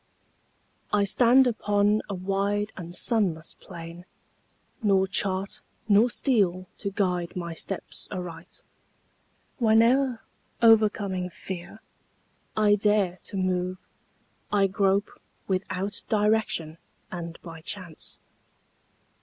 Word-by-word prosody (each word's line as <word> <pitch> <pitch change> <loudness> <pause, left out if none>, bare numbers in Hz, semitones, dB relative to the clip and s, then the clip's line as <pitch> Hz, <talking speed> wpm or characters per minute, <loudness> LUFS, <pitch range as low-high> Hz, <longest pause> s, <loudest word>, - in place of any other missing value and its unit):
I 205 -1 +3
stand 245 +6 +5
upon 210 -3 +2
a 200 - -2
wide 200 +3 -1
and 175 -1 -8
sunless 185 -10 +1
plain, 170 +1 -10 0.8
Nor 195 -3 +3
chart 190 0 0 0.3
nor 215 +3 +5
steel 195 -9 +1
to 200 - -2
guide 180 -3 -1
my 170 -2 -4
steps 190 +3 -6
aright. 175 -2 -7 1.0
Whene'er, 235 +2 +4 0.4
o'ercoming 210 -5 +3
fear, 185 +4 -8 0.8
I 210 -1 +5
dare 205 -3 +2
to 200 - -5
move, 185 0 0 0.7
I 200 -1 +4
grope 195 +1 0 0.3
without 195 +1 -2
direction 210 -7 +1 0.3
and 170 -2 -6
by 165 -2 -9
chance. 175 -1 -7
195 Hz, 95 wpm, -26 LUFS, 180-210 Hz, 1.0 s, stand